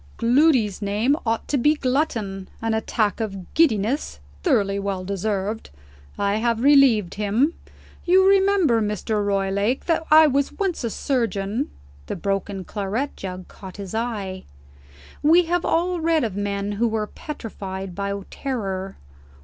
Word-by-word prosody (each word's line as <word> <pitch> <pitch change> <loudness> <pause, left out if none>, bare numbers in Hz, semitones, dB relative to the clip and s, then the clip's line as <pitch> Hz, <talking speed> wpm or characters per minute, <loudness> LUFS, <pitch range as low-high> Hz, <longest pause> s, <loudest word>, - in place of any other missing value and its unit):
"Gloody's 240 -5 +3
name 210 +7 +1
ought 225 0 -1
to 285 - 0
be 295 +5 +4
Glutton. 240 -9 -1
An 225 0 -1
attack 220 -1 0
of 195 -5 -5
giddiness, 260 -3 +1 0.2
thoroughly 205 - +1
well 195 -2 -3
deserved. 200 +2 -3 0.5
I 200 +1 +1
have 230 +1 0
relieved 265 -10 +5
him. 215 +10 +1 0.5
You 375 +2 +5
remember, 385 - +4
Mr. 210 0 -1
Roylake, 200 +4 0
that 330 -1 +1
I 315 +1 +8
was 280 -1 +1
once 385 -8 -2
a 235 - -1
surgeon 230 -1 -1 0.2
" 70 0 -25
The - - -3
broken 195 +1 -2
claret 210 +9 -3
jug 185 -1 -7
caught 190 -1 -11
his 200 -1 -7
eye. 210 -5 -3 0.8
We 330 +4 +5
have 345 +1 0
all 350 +2 +1
read 325 -1 +2
of 215 -5 -2
men 200 0 -2
who 220 +4 +1
were 220 -1 -1
petrified 195 - -7
by 200 +1 -3
terror. 195 -8 -4
220 Hz, 140 wpm, -23 LUFS, 200-280 Hz, 0.8 s, I